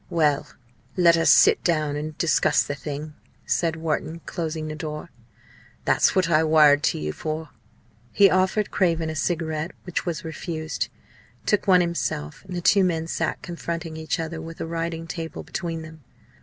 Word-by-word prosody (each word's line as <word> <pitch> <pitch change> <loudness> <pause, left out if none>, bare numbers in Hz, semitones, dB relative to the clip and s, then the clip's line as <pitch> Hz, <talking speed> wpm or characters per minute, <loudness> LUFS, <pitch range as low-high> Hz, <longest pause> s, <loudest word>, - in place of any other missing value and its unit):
"Well, 150 -4 +2 0.5
let 170 -2 +6
us 165 - +3
sit - - +6
down 155 -4 +1
and 150 +1 -5
discuss 170 - +3
the 145 - -4
thing," 150 +1 -6 0.3
said 165 -2 +1
Wharton, 160 0 -3
closing 160 -3 -3
the 155 - -4
door, 155 +1 -6 0.7
"that's - - +3
what 185 -3 +3
I 160 -1 +4
wired 150 -2 +6
to - - +1
you 75 0 -3
for." 155 -1 -4 0.6
He 200 - +6
offered 190 +3 +1
Craven 165 -4 +1
a - - -6
cigarette, 160 0 -2
which 180 - -3
was 175 0 -4
refused, 160 0 -4 0.6
took 210 - +1
one 180 -2 +6
himself, 170 - -3
and 185 -1 -7
the 175 - -2
two 195 +3 +5
men 165 -3 0
sat 165 - -2
confronting 170 -2 -5
each 160 +1 -2
other 165 0 -4
with 165 0 -9
a - - -3
writing 165 0 -3
table 165 -1 -6
between 165 -3 -4
them. 160 -1 -12
160 Hz, 170 wpm, -24 LUFS, 155-170 Hz, 0.7 s, let